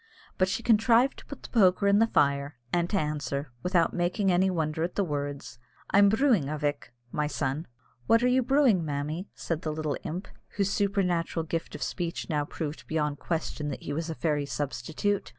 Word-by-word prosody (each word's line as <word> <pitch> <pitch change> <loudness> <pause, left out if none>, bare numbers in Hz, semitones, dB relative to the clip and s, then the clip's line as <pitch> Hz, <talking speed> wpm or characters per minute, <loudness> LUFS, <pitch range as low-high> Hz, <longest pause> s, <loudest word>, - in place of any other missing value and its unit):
But 185 - +4
she 230 - -2
contrived 230 +3 +4
to - - -15
put 280 - -9
the - - -9
poker 200 -3 +4
in 200 +1 +5
the 225 - +5
fire, 140 -4 +1 0.2
and 175 0 +1
to 205 - +1
answer, 145 -4 -2
without 180 0 +2
making 180 +3 +1
any 185 +2 +3
wonder 160 -3 -1
at 170 +2 -2
the 200 - +2
words, 145 -6 -4 0.3
"I'm 200 0 +6
brewing, 220 - +3
a 155 - -2
vick" 145 -3 -2 0.2
(my 150 0 0
son). 135 -2 -1
"And 160 - -7 0.4
what 230 +1 +5
are - - +4
you 255 +1 +4
brewing, 255 - +3
mammy?" 150 +5 -3
said 165 -1 -3
the 155 - -2
little 150 -1 -2
imp, 180 +5 -4 0.3
whose 200 -1 +1
supernatural 180 -5 0
gift 165 0 -3
of - - -4
speech 170 -1 -3
now 150 -1 +1
proved 155 0 -6
beyond 150 -2 -1
question 160 -3 -3
that 140 - -6
he 145 - -4
was 165 +2 -3
a 160 - -3
fairy 150 -3 0
substitute. 160 +8 -2
165 Hz, 200 wpm, -28 LUFS, 150-200 Hz, 0.4 s, I'm